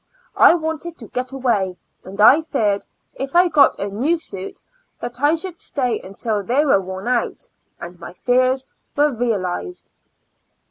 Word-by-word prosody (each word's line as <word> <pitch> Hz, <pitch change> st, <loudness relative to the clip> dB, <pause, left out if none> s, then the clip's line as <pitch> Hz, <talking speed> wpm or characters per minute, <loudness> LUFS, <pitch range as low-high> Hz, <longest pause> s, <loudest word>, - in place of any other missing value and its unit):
I -, -, +7 dB
wanted 320 Hz, 0 st, -4 dB
to 225 Hz, -, -10 dB
get 255 Hz, +1 st, -4 dB
away, 220 Hz, -9 st, 0 dB, 0.3 s
and 190 Hz, +2 st, -10 dB
I 265 Hz, +9 st, +7 dB
feared 215 Hz, -10 st, -1 dB, 0.3 s
if 270 Hz, +4 st, -6 dB
I 355 Hz, 0 st, +6 dB
got 290 Hz, -4 st, +4 dB
a 200 Hz, -, -2 dB
new 255 Hz, +12 st, 0 dB
suit 195 Hz, -, -7 dB, 0.4 s
that 240 Hz, +2 st, -6 dB
I 295 Hz, +3 st, +4 dB
should 345 Hz, +1 st, -4 dB
stay 250 Hz, -6 st, -1 dB
until 205 Hz, +2 st, -3 dB
they 255 Hz, +9 st, +1 dB
were 235 Hz, -9 st, +4 dB
worn 190 Hz, +2 st, -7 dB
out, 250 Hz, -1 st, -1 dB, 0.3 s
and 175 Hz, 0 st, -9 dB
my 175 Hz, -, -9 dB
fears 255 Hz, +5 st, +1 dB, 0.3 s
were 290 Hz, 0 st, +3 dB
realized. 230 Hz, -, -3 dB
250 Hz, 155 wpm, -20 LUFS, 200-295 Hz, 0.4 s, I